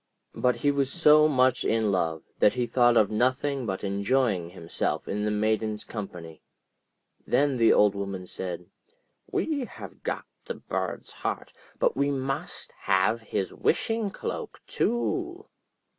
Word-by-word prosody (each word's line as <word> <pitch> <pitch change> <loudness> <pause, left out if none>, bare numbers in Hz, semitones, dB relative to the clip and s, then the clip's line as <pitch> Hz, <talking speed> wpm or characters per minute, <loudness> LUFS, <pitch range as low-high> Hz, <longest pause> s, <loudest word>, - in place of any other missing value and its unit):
But 125 -1 +2
he 145 - +5
was 140 -1 0
so 155 -2 +6
much 130 -3 +3
in 110 -2 +2
love, 80 -4 0 0.2
that 105 - +4
he 125 -1 0
thought 120 0 +4
of 110 -2 +4
nothing 130 +3 0
but 95 -1 -3
enjoying 100 -2 +1
himself 85 -2 -3
in 105 +1 -2
the - - +1
Maiden's 110 0 0
company. 90 -7 -8 0.9
Then 140 -2 +2
the 115 -1 +5
Old 105 -1 +5
Woman 100 -2 -4
said: 90 -1 -5 0.7
'We 290 -5 0
have - - -11
got - - -3 0.2
the - - -4
bird's - - -4
heart, - - -4 0.2
but - - +2
we 140 - +1
must 135 +4 -3
have 95 +4 +2
his 100 -3 -3
wishing 225 +3 0
cloak 195 - -5
too.' 350 - -1
115 Hz, 145 wpm, -27 LUFS, 100-140 Hz, 0.9 s, so